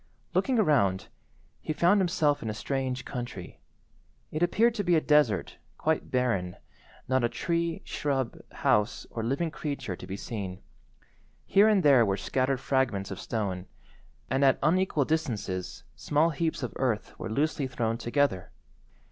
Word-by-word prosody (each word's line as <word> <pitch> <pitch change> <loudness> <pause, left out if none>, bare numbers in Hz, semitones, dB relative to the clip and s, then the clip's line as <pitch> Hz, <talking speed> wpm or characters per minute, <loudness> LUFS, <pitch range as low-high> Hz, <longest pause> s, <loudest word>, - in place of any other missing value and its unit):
Looking 260 -2 +2
around, 125 - +2 0.5
he 155 - -2
found 180 +6 +4
himself 155 -5 +1
in 110 - -3
a 105 - -3
strange 130 +1 -2
country. 120 -8 -6 0.7
It 155 - -3
appeared 220 +7 +3
to 210 -3 -2
be 175 -2 +3
a - - +5
desert, 150 - +2 0.2
quite 160 0 0
barren, 115 -9 0 0.5
not 130 -1 +2
a 120 - +2
tree, 170 +2 -2
shrub, 135 -4 -2 0.2
house, 105 +1 +1
or 115 - -4
living 140 +8 -1
creature 140 - -4
to - - -10
be 95 - -5
seen. 100 -4 -6 0.8
Here 205 +2 +5
and 205 -4 +3
there 135 -5 +6
were 100 -3 0
scattered 130 +6 0
fragments 120 -9 0
of 95 - -5
stone, 95 -5 -3 0.6
and 135 +2 +1
at 135 -1 +5
unequal 160 -2 +2
distances 115 - -2
small 155 +3 +2
heaps 160 -1 -2
of 125 - -4
earth 125 -5 -1
were 115 - -4
loosely 140 +3 0
thrown 115 -2 -2
together. 120 -6 0
130 Hz, 150 wpm, -28 LUFS, 110-155 Hz, 0.8 s, there